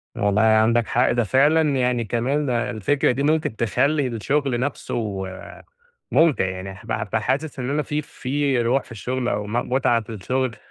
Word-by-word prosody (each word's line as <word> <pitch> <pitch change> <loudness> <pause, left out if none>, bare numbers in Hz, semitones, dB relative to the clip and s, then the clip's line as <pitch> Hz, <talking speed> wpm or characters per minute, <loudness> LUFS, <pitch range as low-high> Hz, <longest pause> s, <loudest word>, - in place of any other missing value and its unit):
والله 100 +1 +1
عندك 110 +1 +3
حق 125 +2 +2
ده 120 0 +1
فعلًا 145 +8 +4
يعني 125 -2 +1
ده - - -10
كمان 135 +5 0
الفكرة 120 +3 +1
دي 135 +3 -2
ممكن 155 -5 +1
تخلّي 135 +6 +1
الشغل 130 +2 -1
نفسه 110 -6 -3 0.9
مُمتِع 160 -10 +4
يعني، 95 +1 -6 0.4
فحاسس 135 +7 -1
إن 125 0 -3
أنا 150 +1 0
في 150 +1 -2
في 140 -2 -1
روح 125 +3 +1
في - - -13
الشغل 125 +3 -3
أو 105 -2 -1
م 105 - -7 0.2
متعة 130 -3 +2
في 110 - -11
الشغل 125 +4 -2
125 Hz, 165 wpm, -22 LUFS, 110-140 Hz, 0.9 s, فعلًا